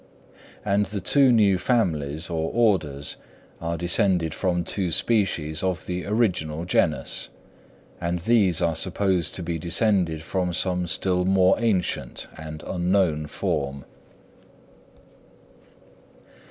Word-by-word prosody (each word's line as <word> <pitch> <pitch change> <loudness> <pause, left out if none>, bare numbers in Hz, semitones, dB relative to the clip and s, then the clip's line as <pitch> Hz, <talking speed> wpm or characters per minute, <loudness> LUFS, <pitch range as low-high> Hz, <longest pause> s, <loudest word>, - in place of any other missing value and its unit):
And 100 0 +1
the 100 +1 -4
two 135 +8 +4
new 100 -5 +4
families, 80 - 0
or 80 -1 -2
orders, 80 -12 0 0.4
are 85 0 -2
descended 85 -2 +2
from 90 -3 -1
two 90 +2 -1
species 85 -6 0
of 95 -1 -2
the 90 0 -4
original 90 -7 0
genus; 90 - 0 0.7
and 85 +1 -2
these 95 -2 +2
are 85 -1 +1
supposed 95 0 0
to 90 - -3
be 85 -1 -3
descended 85 -2 +1
from 90 +1 -2
some 90 0 +1
still 90 +2 0
more 95 0 +4
ancient 105 -7 -1
and 80 -1 -9
unknown 90 -4 0
form. 70 -2 -3
90 Hz, 115 wpm, -24 LUFS, 80-100 Hz, 0.7 s, two